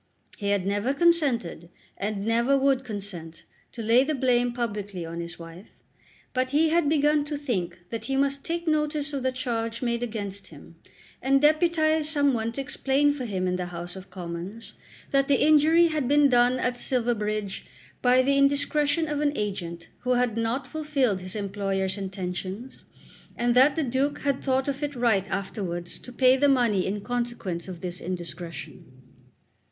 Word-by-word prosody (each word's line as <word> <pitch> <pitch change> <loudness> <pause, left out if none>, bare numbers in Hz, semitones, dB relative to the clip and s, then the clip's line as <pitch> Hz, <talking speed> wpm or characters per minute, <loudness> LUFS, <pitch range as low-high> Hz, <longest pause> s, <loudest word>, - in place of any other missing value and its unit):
He 200 -2 -3
had 200 -2 +1
never 205 +7 0
consented, 275 - +1 0.3
and 205 0 -3
never 235 +5 +3
would 270 -1 +2
consent, 195 -8 -6 0.3
to 230 - -6
lay 230 +4 +5
the 305 +2 -1
blame 245 -2 +2
publicly 205 -7 -4
on 165 +1 -6
his 170 0 -7
wife; 170 +3 -12 0.6
but 255 -1 0
he 310 +4 +3
had 325 -2 +2
begun 295 -1 +3
to 295 0 -4
think 185 - -3
that 230 - -4
he 270 - -1
must 275 0 0
take 340 0 -3
notice 300 -1 0
of 275 - -2
the 260 0 0
charge 230 -2 -3
made 235 -1 0
against 200 -4 -5
him, 165 +2 -14 0.5
and 270 +1 +3
deputize 310 0 +3
some 285 -3 +2
one 225 -1 -1
to 275 - -3
explain 275 +1 +1
for 270 -3 -5
him 190 -4 -2
in 180 0 0
the 180 -1 -3
House 175 +1 -7
of 190 0 -10
Commons 180 +4 -6 0.4
that 275 0 +3
the 280 -2 +3
injury 315 +3 +5
had 305 -5 -1
been 290 +1 +5
done 245 0 +4
at 250 -1 -1
Silverbridge 215 -6 -1 0.3
by 250 +1 +5
the 275 +1 +2
indiscretion 290 +3 +2
of 295 -1 -2
an 295 -1 +2
agent 170 -5 -4
who 250 -1 0
had 245 -2 +1
not 230 +4 -1
fulfilled 275 -9 0
his 185 +3 -5
employer's 195 -2 -1
intentions, 190 +4 -6 0.5
and 240 0 +1
that 260 +4 +5
the 320 - 0
Duke 275 +3 -1
had 280 -1 -1
thought 265 0 +1
it 285 +1 -3
right 220 -6 +1
afterwards 180 -3 -4
to 250 - -11
pay 255 +1 +5
the 285 +1 +4
money 235 -8 +2
in 205 +2 -2
consequence 235 -7 -3
of 180 -3 -8
this 180 -1 -5
indiscretion. 170 -6 -6
240 Hz, 170 wpm, -26 LUFS, 195-280 Hz, 0.6 s, lay